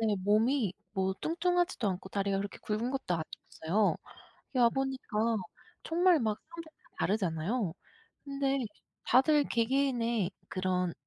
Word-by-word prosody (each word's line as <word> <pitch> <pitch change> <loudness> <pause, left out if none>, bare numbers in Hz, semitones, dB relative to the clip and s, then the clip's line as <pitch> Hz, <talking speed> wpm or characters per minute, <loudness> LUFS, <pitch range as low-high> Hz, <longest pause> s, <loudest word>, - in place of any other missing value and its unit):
네. 220 -2 +2
몸이 215 +2 +3 0.2
뭐 190 -1 0
뚱뚱하지도 350 - +1
않고 185 0 -4
다리가 200 -1 0
그렇게 200 0 -4
굵은 220 +4 -1
것도 265 -10 -1 0.5
아니었어요. 200 +6 +3 0.6
여기 - - +1
와보니까 235 -3 +1 0.5
정말 345 -1 +4
막 215 -2 0
사람들 335 -1 -9
다 - - -23
다르잖아요. 190 0 0 0.5
근데 275 -1 0 0.5
다들 290 +4 +5
개개인의 235 -5 +1 0.2
그런 185 -2 0
230 Hz, 295 characters per minute, -31 LUFS, 195-275 Hz, 0.6 s, 다들